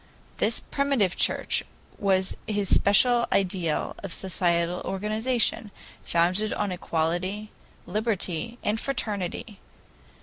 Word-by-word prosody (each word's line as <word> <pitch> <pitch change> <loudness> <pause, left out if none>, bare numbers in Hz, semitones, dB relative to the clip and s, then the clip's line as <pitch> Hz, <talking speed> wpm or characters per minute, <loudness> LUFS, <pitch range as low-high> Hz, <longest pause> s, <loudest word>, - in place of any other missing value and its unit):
This - - +1
Primitive 275 -10 +1
Church - - +2 0.4
was 190 -3 +1
his 205 -2 +1
special 235 +4 +4
ideal 180 -5 0
of 195 - -6
social 175 -1 0
organization, 215 +3 0 0.3
founded 185 +6 +1
on 205 -2 -1
equality, 180 +5 -2 0.3
liberty, 215 +1 -2
and 215 +1 +1
fraternity. 210 -5 -3
200 Hz, 95 wpm, -26 LUFS, 180-220 Hz, 0.4 s, special